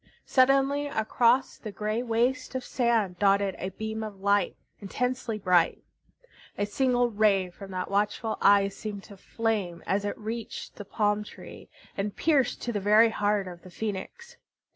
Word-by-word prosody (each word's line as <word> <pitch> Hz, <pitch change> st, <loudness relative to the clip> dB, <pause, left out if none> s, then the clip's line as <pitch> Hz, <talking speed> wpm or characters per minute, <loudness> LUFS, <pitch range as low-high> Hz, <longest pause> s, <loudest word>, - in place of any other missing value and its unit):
Suddenly 275 Hz, +2 st, +3 dB
across 240 Hz, +1 st, +2 dB
the 215 Hz, -, -7 dB
gray 215 Hz, +3 st, -2 dB
waste 250 Hz, +2 st, 0 dB
of 260 Hz, -, -2 dB
sand 225 Hz, -8 st, 0 dB
dotted 200 Hz, -1 st, +3 dB
a 185 Hz, -, -3 dB
beam 220 Hz, +3 st, -5 dB
of 210 Hz, -3 st, -7 dB
light, 200 Hz, +1 st, +1 dB, 0.2 s
intensely 245 Hz, +2 st, -2 dB
bright. 180 Hz, -4 st, +2 dB, 0.7 s
A 205 Hz, -, 0 dB
single 245 Hz, +2 st, +1 dB
ray 200 Hz, -4 st, +2 dB
from 195 Hz, +2 st, -11 dB
that 185 Hz, 0 st, -4 dB
watchful 210 Hz, +2 st, 0 dB
Eye 200 Hz, 0 st, +5 dB
seemed 200 Hz, 0 st, -7 dB
to 200 Hz, -, -13 dB
flame 205 Hz, -5 st, -2 dB
as 195 Hz, +1 st, 0 dB
it 205 Hz, -, -3 dB
reached 225 Hz, +1 st, -6 dB
the 205 Hz, -, -7 dB
palm 210 Hz, +1 st, 0 dB
tree -, -, -12 dB, 0.3 s
and 200 Hz, 0 st, -3 dB
pierced 285 Hz, -6 st, +1 dB
to 240 Hz, -, -2 dB
the 205 Hz, -, -1 dB
very 210 Hz, +3 st, +5 dB
heart 205 Hz, -2 st, 0 dB
of 175 Hz, -1 st, -9 dB
the 185 Hz, -, -13 dB
Phoenix. 220 Hz, -, -6 dB
210 Hz, 160 wpm, -27 LUFS, 200-235 Hz, 0.7 s, Eye